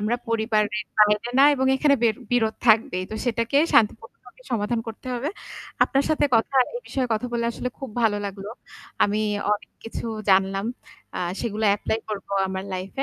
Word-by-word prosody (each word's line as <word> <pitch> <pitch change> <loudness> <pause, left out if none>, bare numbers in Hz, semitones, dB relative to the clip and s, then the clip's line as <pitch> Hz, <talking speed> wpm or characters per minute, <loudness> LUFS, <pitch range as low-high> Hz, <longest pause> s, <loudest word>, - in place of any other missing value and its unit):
আমরা 215 +3 0
পরিবারের 220 -1 0 0.2
বাইরে 210 +2 +4
না 275 - +8
এবং 265 -1 0
এখানে 280 +1 +4
বির 225 -2 +3 0.2
বিরোধ 220 -3 +2
থাকবেই। 215 -5 +3
তো 220 - -5
সেটাকে 230 +2 +1 0.2
শান্তিপূর্ণভাবে 225 +3 0
সমাধান 225 +1 0
করতে 225 +3 -9
হবে। 255 +5 -2 0.6
আপনার 275 0 +1
সাথে 310 - +2
কথা 225 +4 0 0.2
এই 485 - -4
বিষয়ে 260 -2 -2
কথা 220 +3 -1
বললে 235 -1 0
আসলে 250 - -4
খুব 270 -3 -7
ভালো 215 -2 +3
লাগলো। 200 +1 -7 0.5
আমি 205 +1 0 0.3
অনেক 210 - -4
কিছু 225 - -5 0.2
জানলাম। 195 +1 +3 0.5
আ - - -2 0.2
সেগুলো 220 -1 -2
এপ্লাই 220 - -2
করবো 200 -2 -6 0.2
আমার 190 0 -4
লাইফ 185 +1 -5
220 Hz, 165 wpm, -24 LUFS, 210-240 Hz, 0.6 s, না